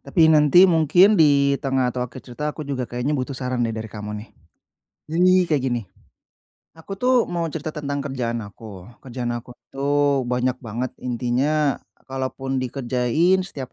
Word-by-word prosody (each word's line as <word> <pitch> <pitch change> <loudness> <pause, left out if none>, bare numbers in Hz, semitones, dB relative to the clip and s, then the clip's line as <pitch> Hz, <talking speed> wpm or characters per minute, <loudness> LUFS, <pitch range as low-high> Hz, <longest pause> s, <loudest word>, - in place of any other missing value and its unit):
Tapi 170 -5 +2
nanti 150 +4 +6
mungkin, 175 +4 +5
di 140 -2 +4
tengah 130 -3 0
atau 125 - -4
akhir 125 +1 -6
cerita, 140 +4 -4
aku 150 0 -6
juga 130 -4 -4
kayaknya 125 +4 -2
butuh 135 -1 -3
saran 125 -1 -3
deh, 115 -2 -1
dari 110 -1 -6
kamu, 105 0 -6
nih. - - -22 0.8
Jadi 175 +4 +3 0.2
kayak 150 -4 +1
gini. 120 -2 0 1.0
Aku 165 +4 -10
tuh, 250 -1 +3
mau 170 -1 -3
cerita 155 0 -5
tentang 145 -2 -4
kerjaan 120 -5 -3
aku. 100 -2 -11 0.2
Kerjaan 125 -2 -4
aku 120 +1 -7 0.2
tuh, 140 -1 +1
banyak 125 +1 -1
banget. 120 +2 -4
Intinya, 130 +4 0 0.2
kalaupun 135 0 -3
dikerjain 130 +8 +1
setiap 140 -9 -7
135 Hz, 155 wpm, -22 LUFS, 125-150 Hz, 1.0 s, nanti